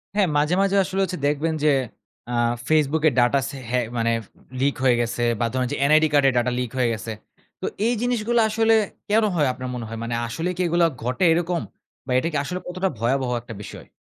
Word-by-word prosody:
হ্যাঁ। 200 -4 +3
মাঝে, 150 +4 +2
মাঝে 195 0 +2
আসলে 190 +1 -3
হচ্ছে 185 -1 -3
দেখবেন 150 +3 0
যে, 155 - +5 0.6
আ - - 0 0.3
Facebook 155 0 +2
এ - - -6
ডাটা 120 +3 +4
সে 140 - -8
হ্যাঁ, 125 0 +1
মানে 115 0 +1 0.5
লিক 140 +1 +2
হয়ে 125 -2 +5
গেছে 120 0 -2 0.2
বা, 120 - +1
ধরুন 130 -1 0
যে - - -1 0.2
NID 155 +1 +6
কার্ডের 135 -2 +4
ডাটা 120 +1 +2
লিক 125 -3 -3
হয়ে 125 -2 +2
গেছে। 110 +1 -5 0.5
তো - - -3 0.2
এই 245 - +2
জিনিসগুলা 240 -1 +1
আসলে 225 +1 +3 0.4
কেন 220 +2 +4
হয় 150 -4 +2
আপনার 130 0 -6
মনে 120 -2 -5
হয়? 115 0 -6
মানে 115 0 -2
আসলে 165 +9 -3
কি 180 - -3
এগুলো 170 0 +3 0.2
ঘটে 125 +8 -1
এরকম 170 0 0 0.4
বা 130 - -5
এটা 145 - -2
কি 150 - -1
আসলে 180 +5 -4
কতটা 185 +2 -1
ভয়াবহ 130 +3 0
1 120 - -18
টা - - -5
বিষয়? - - -10
145 Hz, 215 wpm, -23 LUFS, 125-180 Hz, 0.6 s, NID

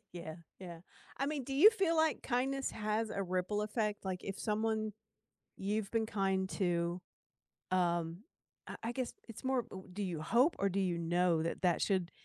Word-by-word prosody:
Yeah, 160 -2 -6 0.2
yeah 170 -3 -8 0.4
I 275 - 0
mean 290 -3 -2
do 270 - -5
you 405 +11 +9
feel 380 -7 +1
like 315 -1 +2
kindness 270 +2 0
has 215 +1 -1
a 195 - -1
ripple 185 +3 -1
effect 210 -1 -1
like 185 -1 -3
if 195 0 -4
someone 215 0 0 0.6
you've 205 +1 -1
been 225 -1 +1
kind 195 -3 0
to, 175 -2 0 0.7
um, 170 -2 +1 0.5
I - - -6
I 235 - -1
guess 255 -1 -2 0.2
it's 230 - -10
more 260 -2 +1
u 190 0 -8
do 205 +2 -3
you 175 -5 -2
hope 245 - +3
or 200 - +2
do 195 +1 0
you 175 -3 0
know 170 -1 +2
that 165 - -3
that 175 -2 +3
should 185 -4 +1
200 Hz, 180 wpm, -34 LUFS, 180-230 Hz, 0.7 s, you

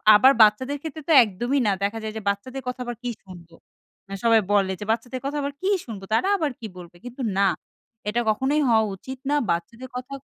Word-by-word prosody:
আবার 260 +6 +7
বাচ্চাদের 235 +7 +4
ক্ষেত্রে 315 -1 -7
তো - - +1
একদমই 240 +7 -1
না - - +4
দেখা 205 +3 -1
যায় 215 - -4
যে - - -5
বাচ্চাদের 255 +7 -4
কথা 250 0 -4
আবার 240 -1 -4
কি 245 - -2 0.2
শুনবো? 175 -3 -13 0.6
এ - - -4
সবাই 230 -1 +5
বলে 195 -2 +3
যে, 210 - -6
"বাচ্চাদের 245 +3 -3
কথা 290 +2 -2
আবার 280 0 -3
কি 380 - 0 0.2
শুনবো? 210 -5 -8
তারা 295 +12 +2
আবার 305 -5 -1
কি 225 - -8
বলবে?" 175 -1 -12
কিন্তু 250 +2 -8 0.2
না, 200 - +4 0.6
এটা 235 - 0
কখনোই 265 +7 +1
হওয়া 220 -1 +4
উচিত 260 +7 -9
না। 295 - +2 0.2
বাচ্চাদের 230 +10 -4
কথা 250 +2 -6
235 Hz, 210 wpm, -24 LUFS, 205-265 Hz, 0.6 s, আবার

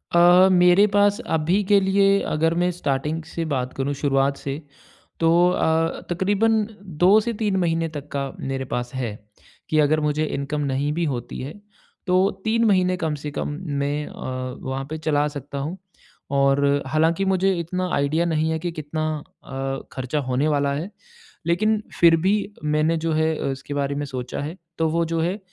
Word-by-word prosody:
अ, 175 +2 +7
मेरे 180 +2 +6
पास 205 +1 +4 0.2
अभी 170 +6 +1
के 200 +1 +4
लिए, 195 +1 +3
अगर 160 +2 +1
मैं 180 - +2
स्टार्टिंग 155 -1 -2
से 165 +1 -5
बात 125 -1 -2
करूँ, 135 +1 -2
शुरुआत 140 0 +1
से, 140 +2 -5 0.6
तो 165 - +3 0.2
अ, 165 -2 +1
तकरीबन 205 +5 +2 0.4
2 200 +4 +7
से 235 +2 -2
3 205 -3 +1
महीने 165 -2 +1
तक 145 -2 -7
का 140 -1 -2
मेरे 135 0 -3
पास 120 0 -2
है, 115 -5 -3 0.5
कि 155 - +2
अगर 155 +1 +3
मुझे 150 0 0
इनकम 150 0 -3
नहीं 140 +2 0
भी 170 +2 0
होती 120 -1 -6
है, 135 +4 -6 0.5
तो 185 +2 +4 0.2
3 230 +1 +2
महीने 185 -3 +3
कम 160 -4 -1
से 150 - -4
कम 145 - -3 0.3
मैं 145 +1 -1
अ, - - -10 0.5
वहाँ 130 +1 -3
पे 155 - -4
चला 150 -2 +1
सकता 145 -1 -7
हूँ 155 +7 -4 0.6
और 140 +1 +3
हालाँकि 160 +6 +2
मुझे 190 0 +2
इतना 180 +2 -2
आइडिया 150 +4 +1
नहीं 160 -1 +1
है 160 - -1
कि, 175 +1 -3
कितना 155 0 -4 0.4
अ, 135 0 -4
खर्चा 130 +3 -2
होने 130 +4 +1
वाला 145 -2 +1
है। 155 +7 -4 0.6
लेकिन 215 +5 +2 0.2
फिर 170 -1 +7
भी 195 - +4 0.3
मैंने 155 +2 +1
जो 165 +1 -1
है, 160 0 +1 0.2
उसके 135 +2 -6
बारे 140 0 -1
में 145 0 -2
सोचा 130 -2 -5
है, 155 +5 -5 0.2
तो 160 -1 +1
वो 165 +1 +1
जो 165 0 -2
है, 180 +5 -1
155 Hz, 180 wpm, -23 LUFS, 140-180 Hz, 0.6 s, अ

